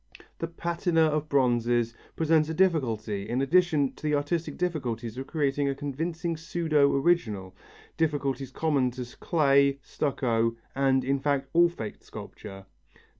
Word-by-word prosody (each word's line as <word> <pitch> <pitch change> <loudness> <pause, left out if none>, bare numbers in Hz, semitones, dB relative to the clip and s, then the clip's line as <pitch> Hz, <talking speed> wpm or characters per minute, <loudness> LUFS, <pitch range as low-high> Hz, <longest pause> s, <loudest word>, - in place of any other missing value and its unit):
The 165 - -2
patina 170 0 0
of 155 -1 +1
bronzes 120 -3 +2 0.2
presents 160 -1 +2
a 160 - -3
difficulty 115 - 0
in 125 - 0
addition 150 -1 +2
to - - -18
the 150 -1 +1
artistic 150 +1 -2
difficulties 120 -10 -3
of 135 +1 -6
creating 145 -2 0
a 135 - -1
convincing 160 +4 -3
pseudo 160 -3 +1
original, 110 - 0 0.4
difficulties 140 -4 -1
common 140 -2 +1
to 125 0 -5
clay, 140 -4 +3
stucco, 115 -5 0 0.2
and, 135 -1 +2
in 135 +1 0
fact, 140 -1 0
all 170 +1 +5
faked 110 -11 -7
sculpture. 95 0 -10
140 Hz, 135 wpm, -27 LUFS, 125-160 Hz, 0.4 s, all